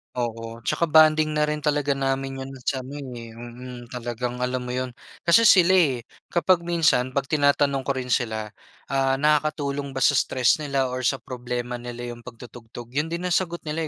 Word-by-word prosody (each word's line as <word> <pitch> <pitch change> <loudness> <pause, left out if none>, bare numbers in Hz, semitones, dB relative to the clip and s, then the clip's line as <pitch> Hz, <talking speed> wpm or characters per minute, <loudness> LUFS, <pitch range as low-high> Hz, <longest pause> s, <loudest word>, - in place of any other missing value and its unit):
Oo, 115 -1 -4
'tsaka 165 +7 -1
bonding 155 0 +6
na 150 0 +1
rin 150 -1 -3
talaga 145 -2 +1
namin 135 0 -2
yun 135 - -8 0.2
sa 130 -2 0
ano, 140 +3 -8 0.2
eh 115 -1 -9
mm. 120 +1 -10
Talagang 120 +1 -4
alam 125 0 -1
mo 125 0 -5
yun. 130 0 -2 0.3
Kasi 200 +7 +6
sila, 185 -3 +6
eh, 140 -11 +3 0.2
kapag 175 +1 +2
minsan 140 -7 +2
'pag 135 +1 -1
tinatanong 145 -2 +3
ko 135 - 0
rin 125 -1 -4
sila, 110 -4 -1 0.4
ah, 135 -1 +2
nakakatulong 145 -1 0
ba 135 - 0
sa - - +6
stress 130 -1 +2
nila 140 -3 -1
or 130 - -3
sa 130 +2 +1
problema 125 -1 -5
nila 120 0 -6
yung 120 +1 -12
pagtutugtog, 120 0 -11
yun 150 +5 -1
din 170 +2 -4
ang 180 - -2
sagot 170 -1 0
nila, 155 +1 -3
135 Hz, 185 wpm, -24 LUFS, 120-150 Hz, 0.4 s, bonding